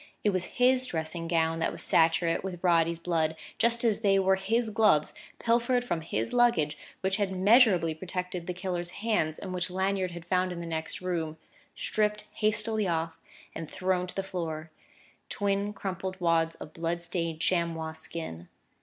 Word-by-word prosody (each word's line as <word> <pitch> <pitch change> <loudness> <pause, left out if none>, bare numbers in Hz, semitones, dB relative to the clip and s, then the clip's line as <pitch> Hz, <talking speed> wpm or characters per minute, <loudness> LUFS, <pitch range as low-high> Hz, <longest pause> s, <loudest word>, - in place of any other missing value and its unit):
It 210 - +3
was 185 -2 -3
his 255 +1 +4
dressing 165 -2 -3
gown 165 -1 +1
that 160 - 0
was - - -3
saturate 165 0 +3
with 185 -2 -6
Roddy's 170 -1 +3
blood, 165 -2 0 0.2
just 235 0 +3
as 220 -3 +3
they 200 -3 +3
were 190 0 +4
his 220 +4 0
gloves, 210 -9 +3 0.2
pilfered 240 +1 +2
from 175 -8 -1
his 200 +8 -3
luggage, 215 -12 +3 0.3
which 190 0 +1
had 200 -2 0
measurably 190 -4 +5
protected 180 +1 -5
the 180 - -2
killer's 180 -1 -3 0.2
hands, 160 -9 +1
and 185 - -6
which 180 0 -1
Lanyard 190 0 0
had 170 -1 -9
found 185 +1 +1
in 175 - -5
the 170 - -5
next 160 0 -4
room, 165 -4 -2 0.4
stripped 210 0 0
hastily 215 0 +1
off 165 -1 -2 0.3
and 160 - -6
thrown 185 -1 0
to - - -7
the 195 - -1
floor 165 -4 -4 0.6
twin 200 0 0
crumpled 190 -2 -5
wads 165 -2 +2
of 155 - -10
blood 170 +1 -2
stained 170 -2 -3
chamois 165 -2 0
skin. 160 - -7
180 Hz, 170 wpm, -29 LUFS, 165-200 Hz, 0.6 s, measurably